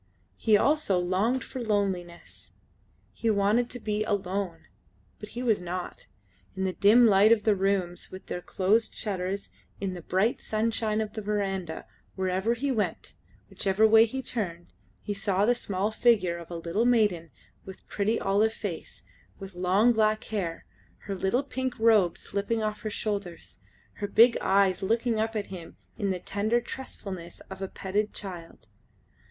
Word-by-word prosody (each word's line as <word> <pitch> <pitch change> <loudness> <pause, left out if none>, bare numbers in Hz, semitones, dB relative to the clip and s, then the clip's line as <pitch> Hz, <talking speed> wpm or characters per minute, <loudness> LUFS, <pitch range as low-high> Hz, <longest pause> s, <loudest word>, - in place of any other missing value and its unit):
He 215 -2 +4
also 285 -6 +2
longed 190 +8 +1
for 260 - -7
loneliness. 195 -6 -3 0.6
He 230 - -1
wanted 215 +4 +2
to 245 - -7
be 215 -1 -1
alone. 190 -4 -2 0.5
But 210 - -8
he 245 - -2
was 220 -6 +2
not. 180 0 -6 0.5
In 190 - -2
the 190 -1 0
dim 220 +6 +6
light 205 0 +6
of 230 -2 +4
the 215 - +4
rooms 190 -2 -1
with 185 - -9
their 180 - -5
closed 205 +6 +1
shutters, 195 -1 -3 0.3
in 195 -2 -2
the 175 - -7
bright 190 +8 0
sunshine 220 0 0
of 215 -1 -4
the 220 - -4
verandah, 195 -5 -2 0.3
wherever 190 +4 0
he 275 +3 -1
went, 220 -5 -2 0.3
whichever 200 +3 +2
way 220 +1 +7
he 265 +4 -5
turned, 175 - -4 0.3
he 205 - -2
saw 200 -1 +1
the 240 - +4
small 200 -3 -2
figure 205 -7 +2
of 170 - -11
a 175 - -6
little 170 +7 -1
maiden 205 -9 +2 0.3
with 190 -1 -12
pretty 215 +3 0
olive 205 +3 +2
face, 200 -8 -6 0.3
with 195 -1 -9
long 185 +7 +3
black 215 -1 +2
hair, 185 -7 -4 0.4
her 200 - -5
little 195 +7 0
pink 260 -2 -3
robe 215 -6 +4
slipping 210 +3 -2
off 215 0 -3
her 215 - -3
shoulders, 200 - -4 0.4
her 205 - -3
big 230 +4 +6
eyes 195 -1 +3
looking 230 +3 +1
up 225 +1 -1
at 210 -2 -2
him 170 -3 -9 0.2
in 205 -3 -2
the 185 - 0
tender 210 +6 0
trustfulness 195 -8 -7
of 190 0 -8
a 195 - -2
petted 205 +3 -2
child. 175 - -7
205 Hz, 160 wpm, -28 LUFS, 185-220 Hz, 0.6 s, way